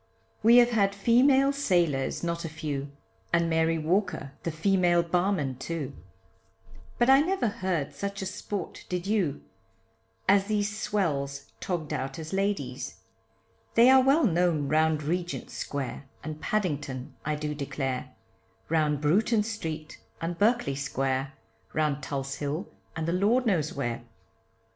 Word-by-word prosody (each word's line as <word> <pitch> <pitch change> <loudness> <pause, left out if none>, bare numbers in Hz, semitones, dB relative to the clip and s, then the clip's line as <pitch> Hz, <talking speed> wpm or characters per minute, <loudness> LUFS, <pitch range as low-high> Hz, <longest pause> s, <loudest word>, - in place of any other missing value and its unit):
We 230 +3 +7
have 245 0 +6
had 200 -3 +2
female 265 +6 +4
sailors 175 - +1
not 170 0 -2
a 165 - -4
few, 145 -3 -4 0.4
And 170 0 +3
Mary 160 0 +2
Walker 180 -2 0
the - - -2
female 175 +1 +3
barman, 170 -7 0
too, 150 -4 -4 1.0
But 240 - +3
I 270 +1 +7
never 365 -4 +1
heard 185 -8 -2
such 200 -1 -4
a - - -3
sport, 195 0 -5
did 180 0 -2
you, 195 -9 0 0.8
As 195 0 +5
these 205 -1 0
swells 140 -10 -2
tog'd 160 -5 -3
out 135 -1 -3
as 160 +1 -7
ladies. 195 +1 -2 0.7
They 240 +3 +7
are 265 0 +8
well 275 +5 +4
known 170 -6 +2
round 155 0 +2
Regent 175 +3 -3
Square. 140 -1 -4 0.2
And 155 0 -6
Paddington 145 -10 -2
I 155 0 -1
do 150 0 -3
declare, 135 -3 -4 0.5
Round 150 -3 +1
Bruton 210 +8 +3
street, 160 -8 -5 0.2
and 170 +1 -3
Berkeley 215 - +2
Square, 135 -1 -1 0.4
Round 150 -2 0
Tulse 135 0 -4
Hill, 150 +7 -3 0.3
and 160 0 -2
the 170 - +1
lord 215 +8 +3
knows 170 -9 +1
where. 120 -4 -3
170 Hz, 140 wpm, -28 LUFS, 145-200 Hz, 1.0 s, are